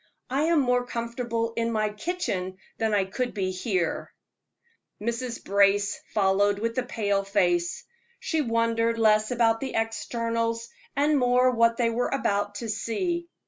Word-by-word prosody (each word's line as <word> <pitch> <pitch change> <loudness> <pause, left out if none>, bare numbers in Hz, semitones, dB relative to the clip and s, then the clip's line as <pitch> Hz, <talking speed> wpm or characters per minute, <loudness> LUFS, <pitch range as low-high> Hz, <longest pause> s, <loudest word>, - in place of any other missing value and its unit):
I 280 +4 +2
am 330 -1 +3
more 250 -1 +2
comfortable 235 -1 -3
in 230 0 0
my 215 -1 +1
kitchen 210 - -3 0.2
than 220 -1 +1
I 200 -2 +2
could 245 +6 -3
be 190 -2 -1
here." 185 -2 -2 0.9
Mrs. 235 +2 -3
Brace 200 +1 +2
followed 200 0 +2
with 230 +2 -2
a - - -1
pale 205 -5 0
face. 175 -3 +1 0.4
She 320 -2 0
wondered 230 -2 +1
less 215 -1 +4
about 230 -2 +2
the 265 +1 -4
externals, 230 +1 -1 0.3
and 290 +1 +3
more 250 0 +4
what 230 -1 +3
they 235 -2 +2
were 245 +2 0
about 205 -6 0
to - - -4
see. 340 - -2
230 Hz, 145 wpm, -26 LUFS, 205-245 Hz, 0.9 s, less